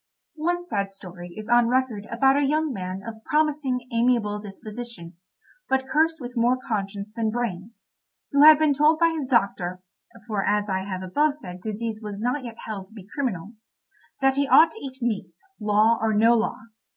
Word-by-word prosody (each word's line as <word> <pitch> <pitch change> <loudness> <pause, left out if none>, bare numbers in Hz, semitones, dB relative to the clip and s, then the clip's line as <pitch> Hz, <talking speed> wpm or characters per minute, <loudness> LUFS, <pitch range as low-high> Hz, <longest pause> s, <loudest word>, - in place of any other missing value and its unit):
One 350 +3 -1
sad 200 - -2
story 180 -3 -10
is 215 0 -7
on 240 0 +4
record 240 -4 0
about 270 +3 +3
a 285 - +2
young 305 +1 +1
man 185 -1 -5
of 220 -1 -8
promising 290 -5 0
amiable 230 -3 +1
disposition, 210 -2 -9 0.6
but 265 0 +1
cursed 320 +3 +2
with 245 -1 -8
more 240 +2 +3
conscience 205 -3 -4
than 225 -1 -1
brains, 220 -2 -4 0.5
who 280 - +4
had 310 0 +10
been 305 -1 +3
told 300 +3 +4
by 335 0 +3
his 295 -5 -3
doctor 185 -7 0 0.4
(for 210 -4 -2
as 210 0 +1
I 190 0 -1
have 190 -1 -5
above 290 +11 +1
said 180 -11 -10
disease 220 +1 -4
was 210 -2 -6
not 250 +6 -1
yet 235 -2 -7
held 200 -3 -6
to 220 - -19
be 195 -4 -11
criminal) 225 - -3 0.7
that 270 0 +3
he 280 0 +2
ought 320 +3 +7
to 445 - -11
eat 265 -2 -7
meat, 225 -4 -2 0.2
law 215 +2 +3
or 220 -1 +1
no 225 +3 +5
law. 230 -1 0
230 Hz, 185 wpm, -24 LUFS, 205-270 Hz, 0.7 s, had